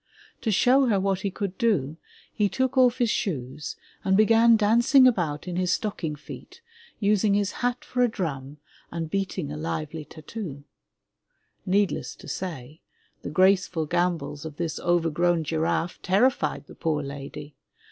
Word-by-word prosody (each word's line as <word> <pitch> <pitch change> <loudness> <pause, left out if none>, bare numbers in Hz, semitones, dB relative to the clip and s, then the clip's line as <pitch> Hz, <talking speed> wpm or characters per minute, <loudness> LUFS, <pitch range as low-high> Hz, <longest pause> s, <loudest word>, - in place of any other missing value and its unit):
To 225 - -1
show 255 +6 +4
her 205 -4 +2
what 195 -1 0
he 200 - -2
could 195 -1 -5
do, 160 - +1 0.4
he 205 -2 +1
took 260 +3 -1
off 255 -2 +4
his 240 -4 +2
shoes 145 -4 -3 0.3
and 190 0 +3
began 225 +2 +6
dancing 235 +5 +5
about 170 -10 0
in 180 -1 -3
his 180 -1 +1
stocking 175 -8 -3
feet, 150 - -11 0.4
using 205 -1 +2
his 205 -1 +1
hat 245 0 -2
for 250 - -1
a 245 - +5
drum 150 - -4 0.3
and 165 -2 -5
beating 185 -6 -2
a 150 - -5
lively 155 0 -4
tattoo! 155 -1 -8 1.0
Needless 200 +1 0
to - - -14
say, 155 -5 -6 0.4
the - - -5
graceful 185 -1 +3
gambols 175 -2 -1
of 160 -2 -7
this 170 -2 -3
overgrown 175 0 +1
giraffe 165 +2 -1
terrified 220 +8 +1
the - - -13
poor 155 -3 -1
lady. 140 +1 -8
180 Hz, 150 wpm, -26 LUFS, 155-215 Hz, 1.0 s, began